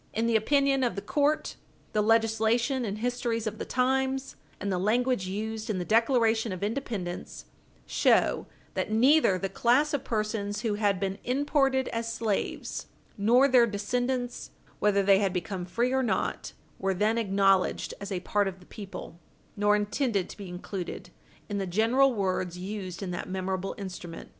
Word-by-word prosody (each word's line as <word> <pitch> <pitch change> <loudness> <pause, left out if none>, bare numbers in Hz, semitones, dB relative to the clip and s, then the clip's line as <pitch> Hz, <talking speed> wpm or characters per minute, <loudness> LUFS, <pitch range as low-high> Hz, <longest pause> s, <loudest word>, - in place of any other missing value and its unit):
In 225 +1 +1
the 230 -1 +2
opinion 275 +4 +3
of 240 - 0
the 200 - -3
court, 295 +1 0 0.4
the 215 - +2
legislation 225 +3 +2
and 205 -1 -3
histories 235 -1 -1
of 215 0 -4
the - - -3
times, 265 +1 0 0.2
and 200 +1 -2
the 180 - 0
language 235 0 +1
used 220 +3 -4
in 210 - 0
the 180 - -3
Declaration 225 0 +3
of 185 +1 -5
Independence, 210 -6 -4 0.4
show - - +2 0.3
that - - -2
neither 245 -2 +5
the 195 - -2
class 245 +10 +2
of 285 - -1
persons 210 -2 -2
who 220 -2 0
had 205 -2 +1
been 195 -1 -2
imported 270 0 +1
as 230 0 -3
slaves 225 -3 -2 0.3
nor 240 +7 +4
their 250 -3 +5
descendants, 245 +4 -2 0.3
whether 200 -1 +3
they 195 0 +5
had 195 -3 0
become 180 0 -3
free 235 +7 0
or 265 - +2
not, 215 -7 -1 0.3
were 190 0 0
then 215 +4 +2
acknowledged 195 -3 +2
as 200 0 -6
a 180 -2 -2
part 205 +2 +1
of 190 -1 -5
the 180 - -17
people, 195 -5 -9 0.4
nor 205 0 +3
intended 210 -1 0
to - - -10
be 200 -3 -8
included 180 0 -6 0.4
in 205 -1 -2
the 195 - -2
general 230 +9 +3
words 185 -3 -1
used 190 -1 -5
in 185 - -3
that 175 - -5
memorable 190 0 -3
instrument. 180 -4 -7
215 Hz, 165 wpm, -28 LUFS, 195-245 Hz, 0.4 s, neither